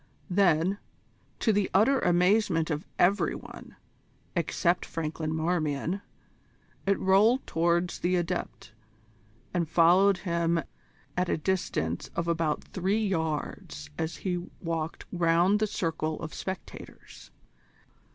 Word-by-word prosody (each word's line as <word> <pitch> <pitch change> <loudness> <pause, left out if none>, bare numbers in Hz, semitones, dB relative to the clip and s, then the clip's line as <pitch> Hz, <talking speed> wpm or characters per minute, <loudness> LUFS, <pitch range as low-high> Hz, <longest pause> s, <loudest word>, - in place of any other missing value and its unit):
Then, 180 0 +3 0.6
to 220 - +3
the 205 -2 +1
utter 255 +7 +5
amazement 175 -2 +2
of 150 0 -3
every 195 +4 +3
one, - - -11 0.6
except 175 +1 +1
Franklin 155 -1 -3
Marmion, 160 +2 -1 0.9
it 200 - +3
rolled 210 +7 +4
towards 170 +2 +1
the 180 +1 +1
Adept 175 - -3 0.8
and 170 -3 0
followed 180 +4 +5
him 170 -2 0 0.5
at 180 0 0
a - - +1
distance 155 - -1
of 170 - -1
about 165 -3 0
three 195 +4 -1
yards 150 - -3
as 160 - -3
he 180 -1 -2
walked 165 -2 -3
round 175 +3 +3
the 215 - +1
circle 160 -4 -2
of - - -6
spectators. 190 -1 -8
175 Hz, 110 wpm, -28 LUFS, 160-190 Hz, 0.9 s, utter